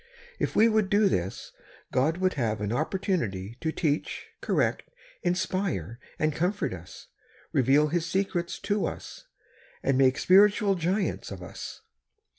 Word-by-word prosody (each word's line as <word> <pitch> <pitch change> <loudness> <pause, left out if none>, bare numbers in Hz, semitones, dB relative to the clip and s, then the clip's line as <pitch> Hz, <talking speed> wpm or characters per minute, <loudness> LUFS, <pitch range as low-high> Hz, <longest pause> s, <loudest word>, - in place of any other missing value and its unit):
If - - -1
we 225 - +6
would 215 -3 +2
do 205 +1 +4
this, 95 - -2 0.4
God 150 +6 +2
would 185 0 +1
have 115 -6 -1
an 105 0 -2
opportunity 125 - -2
to 160 - 0
teach, 155 -2 -2
correct, - - +1 0.4
inspire, 180 - -1 0.2
and 155 0 +1
comfort 180 - -1
us, 90 -1 -11 0.4
reveal 140 +4 +4
His 170 +1 -1
secrets 180 -3 -1
to 205 0 0
us, - - -8 0.6
and 135 - +2
make 130 -1 +4
spiritual 200 +2 +5
giants 185 +2 -1
of 95 -2 -7
us. - - -8
165 Hz, 135 wpm, -27 LUFS, 130-195 Hz, 0.6 s, we